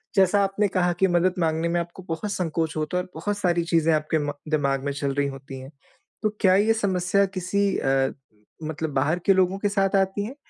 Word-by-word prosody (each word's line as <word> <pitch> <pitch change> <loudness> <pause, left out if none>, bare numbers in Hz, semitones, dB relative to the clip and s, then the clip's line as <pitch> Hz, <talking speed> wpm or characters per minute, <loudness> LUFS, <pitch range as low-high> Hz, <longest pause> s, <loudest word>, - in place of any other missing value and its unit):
जैसा 195 +1 +4
आपने 195 +1 +1
कहा 180 -2 +1
कि 190 - +4
मदद 175 +1 +2
माँगने 160 0 +1
में 175 +1 +1
आपको 170 +2 -7
बहुत 200 +6 -3
संकोच 165 -3 -2
होता 155 +3 -1
है 180 - 0
और - - -15
बहुत 205 +5 -2
सारी 175 -3 +1
चीज़ें 165 -1 +2
आपके 155 +1 0
म 145 - 0 0.2
दिमाग 140 -3 0
में 145 - 0
चल 140 -1 -2
रही 140 0 0
होती 135 -1 -8
है, 130 - -10 0.5
तो 215 - +3
क्या 185 -1 +5
ये 215 +3 +4
समस्या 200 -2 +1
किसी 200 +2 0
अ, 135 0 +1 0.5
मतलब 155 -1 -4
बाहर 150 +6 +1
के 195 - +6
लोगों 190 0 +2
के 205 - 0
साथ 195 -1 +1
आती 195 +1 +1
हैं 250 +6 -7
175 Hz, 215 wpm, -24 LUFS, 155-195 Hz, 0.5 s, के